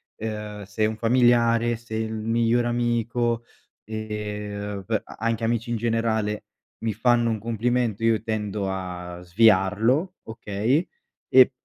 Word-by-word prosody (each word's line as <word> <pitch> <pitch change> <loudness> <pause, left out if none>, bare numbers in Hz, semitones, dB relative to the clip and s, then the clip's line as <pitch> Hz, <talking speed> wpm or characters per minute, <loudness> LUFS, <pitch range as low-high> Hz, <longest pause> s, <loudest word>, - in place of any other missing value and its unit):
ehm, 105 -1 -5
se 105 +2 -1
un 110 +1 -1
familiare, 120 0 +3
se 115 -1 -8
il 110 0 -2
migliore 115 +2 +1
amico, 120 0 0 0.4
ehm, 105 -2 -5
b 110 -2 0
a - - -12
anche 115 0 -1
amici 115 +1 0
in - - +1
generale, 110 -2 0 0.4
mi 110 - 0
fanno 120 +1 +3
un 110 -1 -1
complimento 115 0 0
io 115 -2 +3
tendo 105 -3 -2
a 90 -2 -5
sviarlo 110 - +3
okay, 110 - -1 0.4
e - - +8
110 Hz, 130 wpm, -25 LUFS, 105-115 Hz, 0.4 s, e